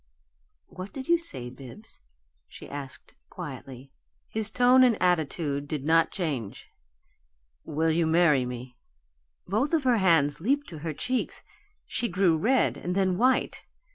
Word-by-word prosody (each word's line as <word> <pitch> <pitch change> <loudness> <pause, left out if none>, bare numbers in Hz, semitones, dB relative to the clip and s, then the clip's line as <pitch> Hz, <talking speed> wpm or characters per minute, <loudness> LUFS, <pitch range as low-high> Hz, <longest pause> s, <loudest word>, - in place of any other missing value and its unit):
"What 185 +2 -9
did 265 -1 -7
you 340 0 +4
say, 130 - -6
Bibbs?" 135 - -13 0.5
she - - -12
asked, 140 -2 -8 0.2
quietly. 135 -6 -9 0.4
His 220 -1 +1
tone 250 +2 +5
and 245 -4 +3
attitude 155 -4 0
did 145 -2 -4
not 165 +1 +4
change. 140 - -5 0.9
"Will 160 +1 0
you 165 0 +1
marry 160 -5 +4
me?" 125 0 -7 0.7
Both 225 - 0
of 310 - 0
her 250 -3 +3
hands 160 -6 +3
leaped 280 - 0
to 160 - -9
her 160 +1 -4
cheeks 255 - -2 0.4
she 240 - -2
grew 185 -4 +2
red 245 +11 +2
and 180 +1 -4
then 190 -1 +1
white. 255 +2 +1
170 Hz, 140 wpm, -27 LUFS, 145-220 Hz, 0.9 s, tone